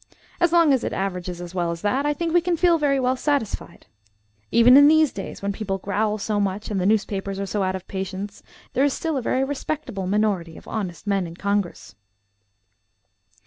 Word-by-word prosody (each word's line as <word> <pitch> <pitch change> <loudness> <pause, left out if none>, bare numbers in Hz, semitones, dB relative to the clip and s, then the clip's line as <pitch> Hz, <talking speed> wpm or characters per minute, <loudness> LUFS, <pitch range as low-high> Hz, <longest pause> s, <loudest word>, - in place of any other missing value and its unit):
As 345 -1 +3
long 335 -4 +5
as 260 - +1
it - - -2
averages 180 -2 -3
as 175 0 -8
well 175 -2 -1
as 170 0 -4
that, 265 +7 +1
I 295 - +2
think 330 +2 -2
we 350 - +5
can 345 0 0
feel 340 -1 +4
very 280 -2 +2
well 255 0 +1
satisfied. 280 -5 -2 0.6
Even 235 +2 +6
in 285 +1 +9
these 315 -1 +5
days, 195 0 -7
when 200 0 -1
people 195 -2 -3
growl 210 +2 -1
so 210 0 -1
much 200 +2 -2
and 195 -3 0
the 180 - +1
newspapers 200 -2 0
are 200 - -2
so 205 +1 -2
out 190 0 0
of 190 -1 -8
patience, 195 +1 -5 0.3
there 260 - +2
is 285 -1 +2
still 325 -2 -2
a 265 - -1
very 255 +2 0
respectable 270 -7 -4
minority 195 -5 0
of - - -14
honest 185 -7 -4
men 195 -3 0
in 165 - -10
Congress." 200 - -2
210 Hz, 205 wpm, -23 LUFS, 190-275 Hz, 0.6 s, in